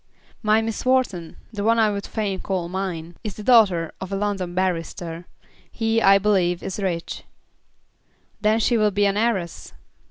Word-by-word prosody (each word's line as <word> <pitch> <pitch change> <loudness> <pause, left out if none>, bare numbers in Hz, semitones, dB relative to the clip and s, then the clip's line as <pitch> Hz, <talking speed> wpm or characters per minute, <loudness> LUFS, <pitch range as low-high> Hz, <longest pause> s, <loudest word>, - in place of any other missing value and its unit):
"My 215 0 +3
Miss 225 -1 -3
Wharton, 250 -11 0 0.2
the 205 -1 -3
one 230 +2 +3
I 220 -2 +4
would 200 -1 -4
fain 200 -4 -2
call 185 -3 -2
mine, 175 -2 -4
is 210 -3 -5
the 210 - -8
daughter 200 -9 +4
of 190 0 -6
a - - -1
London 195 -3 -2
barrister. 175 -2 -2 0.4
He, 225 0 0
I 195 -1 +7
believe, 190 -4 +1
is 190 - -4
rich." 175 -4 -3 1.2
"Then 215 +1 +3
she 235 +2 +2
will 215 -1 +3
be 205 0 +1
an 200 0 +2
heiress." 205 -6 -1
200 Hz, 165 wpm, -23 LUFS, 180-215 Hz, 1.2 s, I